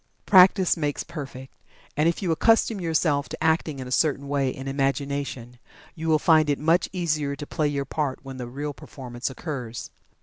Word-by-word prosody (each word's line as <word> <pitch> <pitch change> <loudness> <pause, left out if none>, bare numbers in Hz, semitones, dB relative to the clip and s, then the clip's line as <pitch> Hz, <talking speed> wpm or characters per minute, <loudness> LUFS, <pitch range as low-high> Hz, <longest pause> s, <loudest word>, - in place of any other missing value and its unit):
Practice 185 -1 +6
makes 145 -3 -2
perfect, 135 -5 -8 0.4
and 155 +3 +3
if 170 - -3
you 175 - +1
accustom 225 +3 +3
yourself 155 -5 +1
to - - -6
acting 160 -2 +1
in 130 -1 -6
a - - -8
certain 140 0 +1
way 140 -2 +1
in 130 +1 -6
imagination, 135 -3 -2 0.3
you 165 -2 -6
will 160 -1 +4
find 155 -1 +4
it 145 - +2
much 165 +4 +2
easier 155 -6 -1
to 145 - -7
play 155 0 -1
your 140 -1 -2
part 140 -1 -2
when 135 -1 -8
the 125 -2 -5
real 145 +4 -5
performance 125 -2 -6
occurs. 130 -5 -6
145 Hz, 180 wpm, -25 LUFS, 135-160 Hz, 0.4 s, Practice